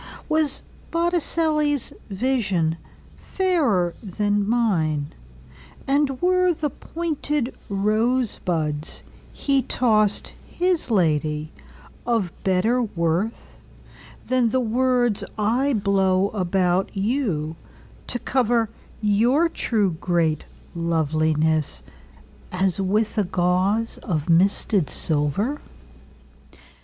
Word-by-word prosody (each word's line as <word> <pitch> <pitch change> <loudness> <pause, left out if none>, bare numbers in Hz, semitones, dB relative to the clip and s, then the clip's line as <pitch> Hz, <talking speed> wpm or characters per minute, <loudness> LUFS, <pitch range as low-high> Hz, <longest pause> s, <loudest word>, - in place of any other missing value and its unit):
Was 310 -3 +1 0.3
Botticelli's 320 -4 +1 0.2
visionFairer 205 - -1
than 205 0 -1
mine; 160 -11 +1 0.7
And 275 -1 +1
were 365 -1 +3
the 300 -2 -2
pointed 300 -5 -3 0.2
rosebudsHe 210 - -1
tossed 215 -4 +1 0.2
his 360 -1 0
ladyOf 165 +4 -2
better 205 +6 +2
worthThan 220 +5 -3
the 260 - +1
words 245 -1 +1
I 240 +7 +1
blow 195 -2 +2
about 185 -2 0
youTo 195 - -1 0.7
cover 235 -3 +2 0.3
your 240 +11 +3
too 205 - 0
great 165 -4 +1 0.3
lovelinessAs 155 - -1
with 210 +3 0
a - - +3
gauzeOf 185 - 0
misted 180 -1 +3
silver? 160 - 0
205 Hz, 70 wpm, -23 LUFS, 170-255 Hz, 0.7 s, were